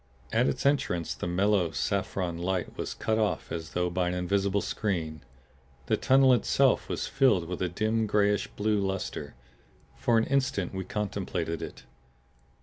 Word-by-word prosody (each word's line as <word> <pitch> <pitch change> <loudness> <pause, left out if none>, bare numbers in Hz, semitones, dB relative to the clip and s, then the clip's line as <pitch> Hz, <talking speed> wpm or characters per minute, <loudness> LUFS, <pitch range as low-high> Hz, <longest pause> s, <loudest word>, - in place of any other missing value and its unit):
At 120 +3 +3
its 130 - -2
entrance 140 - +1
the - - -5
mellow, 95 0 +2
saffron 95 -1 -1
light 90 0 -2
was - - -4
cut 110 0 0
off 105 -2 -1
as 80 -1 -5
though 90 0 0
by 90 0 0
an 90 - -1
invisible 100 +2 +1
screen. 80 -8 -2 0.6
The - - +2
tunnel 135 0 +5
itself 130 +2 +2
was - - -2
filled 110 -11 +3
with 90 0 -5
a 90 - +1
dim 110 +5 0
grayish 105 -1 +2
blue 105 0 0
luster. 95 -6 -3 0.6
For 115 - +2
an 115 - +4
instant 130 -10 0
we 95 -1 -4
contemplated 95 -5 -3
it. - - -8
100 Hz, 155 wpm, -28 LUFS, 90-110 Hz, 0.6 s, tunnel